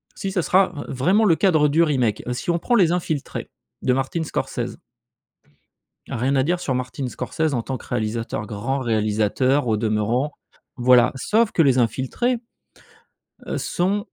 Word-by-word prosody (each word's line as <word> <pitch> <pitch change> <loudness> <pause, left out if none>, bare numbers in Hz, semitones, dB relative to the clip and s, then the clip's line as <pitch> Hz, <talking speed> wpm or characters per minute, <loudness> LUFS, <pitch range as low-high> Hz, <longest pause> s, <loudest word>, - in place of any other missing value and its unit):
si 195 - -4
ça 180 - +1
sera 185 +2 +3 0.2
vraiment 185 - +2
le 170 -5 +5
cadre 155 -7 +3
du 160 +4 +3
remake. 125 -9 0
Si 125 - -5
on 170 0 +2
prend 240 - +1
Les 180 -7 +4
Infiltrés 160 -5 -3 0.3
de 125 - +3
Martin 135 +5 -1
Scorsese - - -4 1.3
rien 130 +4 0
à 130 - +3
dire 175 +4 0
sur 135 -7 -2
Martin 130 +1 -3
Scorsese 155 +4 -2
en 120 - 0
tant 130 +2 -4
que - - -14
réalisateur, 110 -2 -2
grand 120 +7 -3
réalisateur 115 +4 +1
au 110 -1 +2
demeurant, 115 +6 0 0.4
voilà, 125 0 +5
sauf 220 - +1
que 165 - +3
Les 135 -4 +4
Infiltrés, 130 - 0 1.1
heu, - - -2
sont 190 +4 0
135 Hz, 155 wpm, -22 LUFS, 120-170 Hz, 1.3 s, le